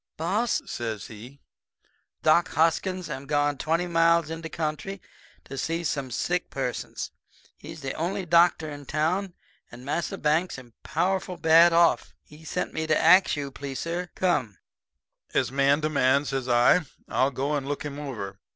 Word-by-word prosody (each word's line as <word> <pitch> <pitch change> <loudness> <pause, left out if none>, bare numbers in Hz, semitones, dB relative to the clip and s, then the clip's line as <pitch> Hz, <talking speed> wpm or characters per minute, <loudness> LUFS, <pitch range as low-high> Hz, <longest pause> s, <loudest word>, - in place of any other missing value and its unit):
"'Boss,' 205 +9 0
says 110 -3 -4
he. 120 +6 -12 0.8
'Doc 170 +3 +4
Hoskins 180 +2 +1
am 140 -3 -6
done 145 0 +2
gone - - -16
twenty 165 +3 0
miles 165 -1 +3
in 165 0 -5
de 165 - -6
country 160 +5 -4 0.4
to 135 0 -7
see 165 +1 -2
some 140 -3 -2
sick 175 +9 -1
persons. 125 -3 -4 0.4
He's 160 -1 -10
de 135 -1 -3
only 180 +3 -2
doctor 170 -1 +4
in 145 -1 -7
de 145 - -13
town, 175 +5 -1 0.4
and 120 +2 -11
Massa 165 +4 -2
Banks 155 +3 0
am 120 -3 -13
powerful 185 +3 -1
bad 165 +2 +6
off. 170 0 +3
He 150 +1 -16
sent - - -3
me 160 0 -2
to 155 - +3
ax 180 +4 +6
you 145 -1 -3
to 140 - -8
please, 135 -1 -6
suh, 175 +2 -3
come.' 130 - 0 0.8
"'As - - +1
man 140 +2 +3
to 155 - 0
man,' 140 -1 +2
says 135 -2 -3
I, 120 +9 +5 0.3
'I'll 130 - +2
go 140 +2 -2
and 140 -2 -3
look 145 0 -3
him 145 0 -5
over.' 105 -9 -6
155 Hz, 175 wpm, -26 LUFS, 135-170 Hz, 0.8 s, bad